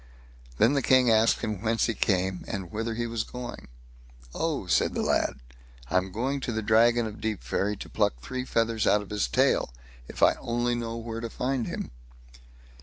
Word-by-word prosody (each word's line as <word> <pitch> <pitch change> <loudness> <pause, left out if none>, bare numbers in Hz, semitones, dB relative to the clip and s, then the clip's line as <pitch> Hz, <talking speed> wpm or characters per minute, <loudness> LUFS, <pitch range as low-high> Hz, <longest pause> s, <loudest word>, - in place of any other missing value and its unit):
Then 115 - +4
the 140 - +2
King 130 -1 +4
asked 110 0 +4
him 105 -4 -3
whence 115 0 +1
he 115 - 0
came, 95 -3 0
and 95 -4 -5
whither 115 +1 -3
he 120 +1 -2
was 115 -1 -2
going? 125 0 -8 0.7
"Oh!" - - -1
said - - +2
the - - 0
lad, - - +1 0.6
"I'm 95 +1 +1
going 130 +7 -1
to 125 - -3
the 110 -1 -2
Dragon 115 +2 +4
of 110 0 -7
Deepferry 105 -1 -1
to - - -8
pluck - - 0
three 130 - -4
feathers 115 -3 0
out 105 0 +4
of 100 - -14
his 105 -10 0
tail, - - +2 0.4
if - - -3
I - - +7
only 120 +1 0
knew 115 -1 -3
where 115 -1 -5
to 115 - -4
find 125 0 -2
him." - - -5
115 Hz, 185 wpm, -27 LUFS, 105-120 Hz, 0.7 s, I